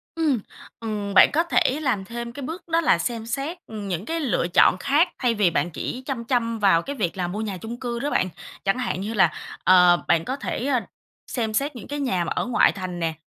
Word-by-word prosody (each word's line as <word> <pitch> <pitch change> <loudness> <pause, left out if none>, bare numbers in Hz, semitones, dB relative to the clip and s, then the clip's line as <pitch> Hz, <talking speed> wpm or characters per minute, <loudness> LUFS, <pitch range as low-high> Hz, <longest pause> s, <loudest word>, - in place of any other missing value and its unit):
Ừm, 310 -7 +1 0.4
ừm, 210 -3 -4
bạn 190 - +8
có 330 +3 +3
thể 300 -4 +1
làm 230 -9 0
thêm 235 +2 -6
cái 280 +2 -8
bước 325 +7 -5
đó 330 0 +2
là 310 - +4
xem 230 -2 -3
xét, 275 +9 -3
ừm, 210 -2 -6
những 180 +1 -3
cái 330 +4 -2
lựa 245 - 0
chọn - - +6
khác 295 +6 +3
thay 245 -3 +2
vì 200 -4 +3
bạn 175 +1 0
chỉ 255 +10 -5
chăm 255 -4 -4
chăm 230 -2 0
vào 190 -5 +4
cái 280 +7 -6
việc 195 -7 -2
là 180 -1 -1
mua 200 +5 -4
nhà 205 -4 -3
chung 230 +6 -7
cư 240 -2 -3
đó 285 +3 -1
bạn. 185 - +1 0.4
Chẳng 195 +4 +2
hạn 245 -7 -2
như 210 +3 -3
là, 190 -6 +4 0.3
ờ, 180 -1 +6
bạn 165 -1 +3
có 260 - -2
thể 280 -1 -3 0.6
xem 225 -3 -2
xét 280 +5 0
những 240 - -9
cái 290 0 -4
nhà 190 -11 0
mà - - -4
ở - - 0
ngoại 245 -1 +4
thành 185 -2 -6
nè. 165 -1 -1
230 Hz, 240 wpm, -24 LUFS, 190-275 Hz, 0.6 s, bạn